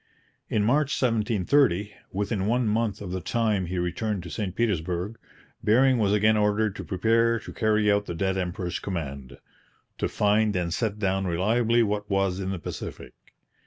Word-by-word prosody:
In 105 - +1
March 140 +5 +2
1730, 110 -2 +2 0.2
within 100 0 -1
one 120 +1 +1
month 105 -1 0
of 95 -3 -6
the 95 0 -3
time 105 -3 0
he 90 +2 -3
returned 90 +3 -2
to 85 - -8
St 95 +1 -3
Petersburg, 95 -1 -1 0.4
Bering 130 +3 +4
was 100 -2 +2
again 105 +1 +4
ordered 105 0 +1
to - - -5
prepare 115 +4 +2
to - - -9
carry 110 -2 +2
out 100 0 +1
the 85 - -4
dead 95 +3 0
emperor's 90 -1 -3
command 70 -7 -5 0.6
'to - - 0
find 105 0 +2
and 85 -2 -1
set 105 -1 -1
down 95 -2 0
reliably 115 +7 +2
what 105 -1 -2
was 95 -2 +1
in 95 -1 -3
the 95 - -2
Pacific.' 85 - -7
105 Hz, 165 wpm, -26 LUFS, 95-110 Hz, 0.6 s, Bering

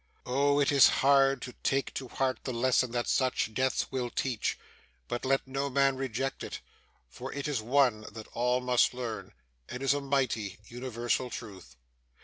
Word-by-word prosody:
Oh! 140 +3 +2
it 140 - +3
is 140 -2 +8 0.2
hard 135 -1 +4
to 125 - -7
take 135 0 0
to 130 - -5
heart 130 +1 -1
the 130 - -3
lesson 125 +1 +2
that 120 0 -2
such 130 -4 +1
deaths 130 +3 0
will 125 -2 -2
teach, 125 -2 -1 0.5
but 120 - -3
let 135 +1 +1
no 135 +1 -2
man 135 0 +3
reject 135 0 -3
it, - - -6 0.5
for - - -8
it 140 +1 -4
is 140 -7 -1
one 120 -2 +2
that 110 0 -9
all 125 +1 +1
must 125 0 +3
learn, 110 -6 -5 0.4
and 125 +2 -5
is 135 0 +4
a 145 - -2
mighty, 130 -8 -1
universal 120 0 -2
Truth. 95 - -9
130 Hz, 170 wpm, -30 LUFS, 120-135 Hz, 0.5 s, is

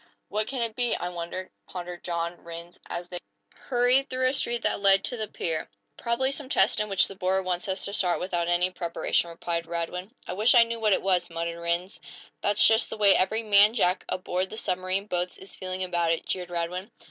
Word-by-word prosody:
"What 215 +1 -1
can 260 -3 -1
it 225 -2 -3
be, 245 -1 +1
I 175 - -3
wonder?" 175 +2 -6 0.2
pondered 175 -1 -7
John 170 0 -3
Rhinds, 170 +1 -9
as 175 0 -5
they 180 0 -4 0.3
hurried 255 +2 +2
through 255 0 0
a - - -1
street 240 -4 +1
that - - +1
led 195 -1 +5
to - - -3
the 220 -2 -3
pier. 165 -5 -3 0.3
"Probably 250 +3 0
some 275 -1 -5
test 195 -7 +3
in 210 0 -1
which 195 -1 +4
the - - -8
board 190 0 0
wants 180 0 -1
us 190 0 -1
to 200 - -1
start 180 -4 +1
without 175 -2 -1
any 175 +1 +3
preparation," 170 -1 0
replied 170 0 -3
Radwin. 175 +3 -4 0.2
"I - - -4
wish 215 +6 +4
I 235 - +9
knew 230 0 -4
what 215 -2 +3
it - - 0
was," 180 -2 +1
muttered 170 0 -4
Rhinds. 170 +2 -2 0.4
"That's 205 0 +3
just 225 +1 +4
the - - -5
way 200 -2 +6
every 220 +4 +1
man 210 +1 +6
jack 180 -5 +2
aboard 185 0 -2
the 220 - -7
submarine 185 0 -1
boats 180 -2 -2
is 190 - -11
feeling 185 0 -3
about 175 -2 +1
it," 165 - -1
jeered 180 -1 -3
Radwin. 175 +3 -3
185 Hz, 215 wpm, -27 LUFS, 175-215 Hz, 0.4 s, I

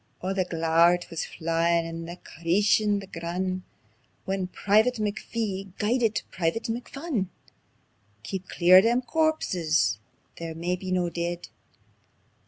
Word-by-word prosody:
Oh 185 +1 -2
the 190 -1 0
glaur 165 +1 +4
it 175 - -9
wis 165 - -3
fylin' 165 +1 +1
and 165 0 -6
crieshin' 205 +4 +2
the - - -8
grun', 185 +1 -3 0.6
When 190 -1 -1
Private 215 +6 +2
McPhee 205 -2 -3
guidit 225 +1 +1
Private 170 +5 -1
McPhun. 245 - -3 1.0
"Keep 185 +9 -5
clear 180 +1 +6
o' - - +9
them 240 +4 +2
corpses 180 - +1 0.4
they're 165 -1 -5
maybe 180 +3 -3
no 180 -2 +1
deid! 170 +1 -3
185 Hz, 120 wpm, -27 LUFS, 170-210 Hz, 1.0 s, o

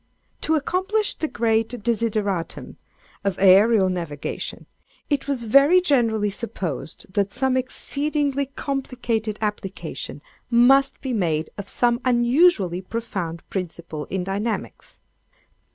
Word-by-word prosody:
To 320 - +2
accomplish 380 +7 0
the 315 - -3
great 225 -3 +1
desideratum 215 -7 -1 0.5
of 195 -2 -1
ærial 195 +1 +5
navigation, 165 -5 -5 0.5
it 285 -1 0
was 270 -4 -1
very 275 +10 +6
generally 230 - +2
supposed 185 - -5
that 200 -1 +1
some 260 +2 0
exceedingly 280 +2 -1
complicated 245 -6 -3
application 185 -9 -5 0.3
must 270 +3 +4
be 265 -2 -3
made 160 -7 0
of 200 -1 -7
some 240 0 +1
unusually 240 - +3
profound 185 -6 -5
principle 170 -4 -5
in 190 -1 -3
dynamics. 205 +4 -4
225 Hz, 105 wpm, -23 LUFS, 190-270 Hz, 0.5 s, very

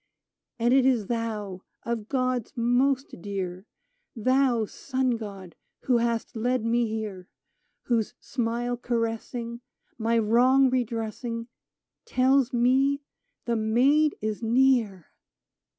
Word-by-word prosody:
And 240 +1 +2
it 265 -1 +5
is 250 -5 +2
thou 210 -4 -3
— - - -47
of 230 -2 -4
gods 255 -3 -1
most 250 -1 +1
dear! 190 0 -5 0.2
— - - -48 0.2
Thou, 255 0 +2
sun 260 +3 -2
god! 200 -6 -6 0.3
who 250 -2 +2
hast 235 +1 -1
led 245 +1 0
me 235 0 +2
here: 215 -4 -5 0.6
Whose 235 -1 0
smile 240 0 -2
caressing. 235 0 -3 0.4
My 230 +1 +1
wrong 250 +4 +4
redressing, 230 -1 -3 0.6
Tells 260 0 +3
me 265 +4 +2 0.4
the 235 - 0
Maid 260 +8 +3
is 215 0 -3
near 230 -6 +2
235 Hz, 115 wpm, -26 LUFS, 220-255 Hz, 0.6 s, it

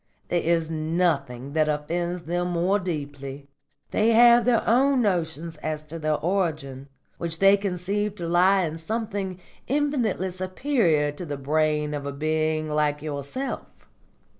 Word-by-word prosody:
There 175 - +1
is 165 -1 +1
nothing 155 -5 -1
that 155 -1 +2
offends 170 +4 -2
them 175 +1 -1
more 180 +4 +1
deeply. 140 -5 -5 0.4
They 225 +2 +3
have 235 0 +7
their 240 -2 +2
own 260 +2 +4
notions 165 -4 -1
as 155 0 -4
to 165 +2 -7
their 155 -1 +1
origin, 150 -7 -2 0.3
which 165 -1 -3
they 195 +2 +6
conceive 200 +1 -2
to 170 -4 -5
lie 185 +3 +4
in 160 -1 -3
something 200 -1 -3 0.3
infinitely 255 -10 0
superior 185 - +1
to 145 +5 -8
the 145 -4 -4
brain 150 +1 0
of 145 -1 -4
a - - -2
being 155 +2 0
like 150 -1 0
yourself. 150 - -4
170 Hz, 140 wpm, -25 LUFS, 150-195 Hz, 0.4 s, have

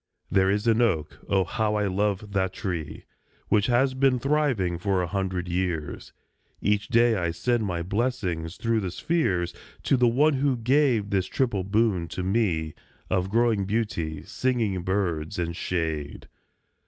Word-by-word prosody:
There 95 -1 +3
is 105 +2 0
an 115 0 +3
oak 95 -10 0
(oh! 95 -1 +3
how 105 +4 -1
I 105 -1 +1
love 100 +1 -1
that 95 -1 0
tree) 85 -8 -4 0.5
Which 105 0 +3
has 130 +2 +3
been 130 -1 +3
thriving 125 - 0
for 95 0 0
a 90 - 0
hundred 95 -1 -2
years; 85 -3 -3 0.5
Each 105 0 0
day 120 -1 +4
I 85 -4 0
send 110 +7 0
my 85 -2 -2
blessing 95 -4 -1
through 115 +6 -1
the 95 -3 -2
spheres 90 - 0 0.3
To 135 - +3
one 125 +6 +4
who 135 -1 +1
gave 120 -4 +2
this 95 -2 +1
triple 115 -8 0
boon 100 -3 +1
to 90 - -5
me, 90 -6 0 0.4
Of 90 +1 +1
growing 115 -2 +2
beauty, 95 -8 -2
singing 115 -8 -1
birds, 85 -4 -1
and 85 -1 -2
shade. 80 -5 -3
100 Hz, 155 wpm, -26 LUFS, 90-115 Hz, 0.5 s, day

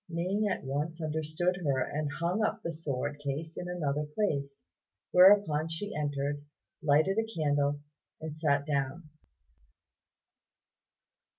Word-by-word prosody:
Ning 185 +5 0
at 185 - -2
once 150 +5 -2
understood 160 +3 -1
her, 140 -7 0
and 145 +3 -1
hung 175 +7 0
up - - -1
the 170 - -2
sword 145 -2 -3
case 145 +3 -4
in 175 - -5
another 150 -4 -1
place; 150 -4 -2 0.5
whereupon 180 -5 +6
she 205 +6 -4
entered, 145 -1 -2 0.4
lighted 155 +7 +3
a - - +2
candle, 145 -4 +1 0.4
and 160 -1 -5
sat 145 -2 +1
down. 145 +2 -2
155 Hz, 120 wpm, -30 LUFS, 145-175 Hz, 0.5 s, whereupon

